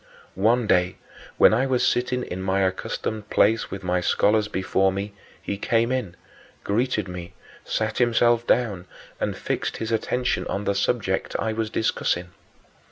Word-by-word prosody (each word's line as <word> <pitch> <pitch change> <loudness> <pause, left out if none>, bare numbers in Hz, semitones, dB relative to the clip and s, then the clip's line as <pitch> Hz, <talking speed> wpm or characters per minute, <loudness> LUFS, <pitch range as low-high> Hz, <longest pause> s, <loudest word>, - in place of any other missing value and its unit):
One 115 +5 +2
day, 90 -3 +2 0.4
when - - +7
I 125 +5 +2
was 130 -2 +2
sitting 125 +1 0
in 95 -4 -5
my 95 +1 +1
accustomed 100 +3 -2
place 110 +2 +3
with 95 - -7
my 90 0 0
scholars 105 +4 +2
before 95 0 +1
me, 100 +2 -4 0.3
he 100 - -5
came 115 +3 +1
in, 125 -9 -2 0.5
greeted 105 -1 0
me, 90 -1 -8 0.3
sat 110 0 -1
himself 120 -1 +3
down, 100 -7 +1 0.3
and - - -2
fixed - - -3
his 110 0 -4
attention 125 +2 0
on 100 - -2
the 100 - +1
subject 100 -1 -1
I 110 - -1
was 110 0 -2
then - - -2
discussing. 90 -4 0
105 Hz, 160 wpm, -24 LUFS, 95-120 Hz, 0.5 s, when